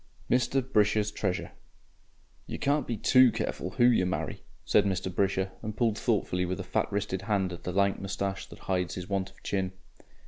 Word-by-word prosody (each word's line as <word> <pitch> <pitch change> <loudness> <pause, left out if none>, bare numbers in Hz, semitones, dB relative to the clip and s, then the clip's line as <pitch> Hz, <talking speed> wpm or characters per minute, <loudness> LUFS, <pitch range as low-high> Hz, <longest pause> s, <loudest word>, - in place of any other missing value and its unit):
11. 130 +2 +2
MR. 130 +2 -19
BRISHER'S 105 0 +3
TREASURE 95 -3 -2 1.0
"You - - -4
can't 145 +1 +1
be 115 - -2
TOO 130 +3 +6
careful 90 - -3
WHO 120 +6 +1
you 115 -7 +4
marry," 90 - -3 0.2
said - - +4
Mr. 95 -2 -1
Brisher, 95 0 +1
and 110 -1 -5
pulled 115 -3 +2
thoughtfully 100 -6 +1
with 90 0 -2
a - - -3
fat - - -1
wristed 100 -2 -2
hand 100 -3 0
at 85 - -10
the 90 - -1
lank 100 +1 +2
moustache 95 0 -3
that - - -12
hides 90 -2 -1
his 90 -1 -6
want 95 -1 -1
of - - -23
chin. 95 -2 -1
100 Hz, 195 wpm, -29 LUFS, 95-110 Hz, 1.0 s, TOO